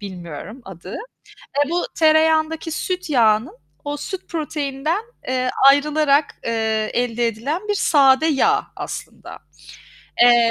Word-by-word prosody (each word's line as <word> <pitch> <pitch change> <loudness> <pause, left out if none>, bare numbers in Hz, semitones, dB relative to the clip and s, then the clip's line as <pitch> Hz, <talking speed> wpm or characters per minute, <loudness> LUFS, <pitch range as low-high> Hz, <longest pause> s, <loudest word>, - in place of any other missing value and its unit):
bilmiyorum 185 - -8
adı. 185 0 -9 0.7
Eee, 290 - -7
bu 350 +1 0
tereyağındaki 315 0 +2
süt 365 +2 -3
yağının, 225 -3 +2 0.3
o 290 0 -3
süt 380 +5 -7
proteininden, 305 +2 -3 0.3
eee, 255 0 0 0.2
ayrılarak, 290 0 +2
eee, 220 -1 -1
elde 240 -1 0
edilen 280 - -3
bir 415 - +1
sade 280 -5 +4
yağ 415 +8 +2
aslında. - - -8 0.8
Eee, 240 -1 +6
280 Hz, 115 wpm, -20 LUFS, 230-315 Hz, 0.8 s, Eee